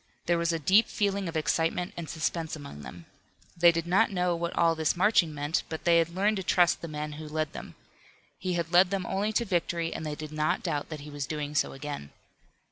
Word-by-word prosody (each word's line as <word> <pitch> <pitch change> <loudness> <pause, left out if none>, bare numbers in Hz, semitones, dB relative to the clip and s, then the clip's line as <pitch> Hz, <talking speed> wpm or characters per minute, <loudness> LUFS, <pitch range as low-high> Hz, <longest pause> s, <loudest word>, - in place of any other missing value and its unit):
There 170 0 +2
was 170 0 +1
a 165 - 0
deep 190 +8 +4
feeling 200 -3 -1
of 165 - -3
excitement 165 +3 0
and 165 -3 -6
suspense 160 +1 -2
among 140 - -9
them. 85 +3 -10 0.5
They 170 0 +6
did 165 -1 -2
not 190 +6 +3
know 180 -2 0
what 170 +1 -3
all 165 -1 +4
this 160 -1 0
marching 185 -4 +4
meant, 145 +2 -1
but 160 - -5
they 170 -1 +5
had 165 0 +1
learned 205 +3 +2
to 190 - -3
trust 175 -1 +3
the 170 - -5
man 150 -1 -4
who 155 +1 -8
led 155 0 -2
them. - - -9 0.6
He 185 0 -2
had 170 0 -2
led 180 +1 +6
them 195 -2 -2
only 200 +3 -1
to 235 +2 +1
victory, 170 -3 -1
and - - -5
they 150 -1 -3
did 155 0 -7
not 155 0 0
doubt 145 - -2
that 155 -3 -6
he 150 +1 -9
was 145 -2 -4
doing 150 -1 -4
so 145 - +1
again. 140 - -6
165 Hz, 230 wpm, -28 LUFS, 150-180 Hz, 0.6 s, They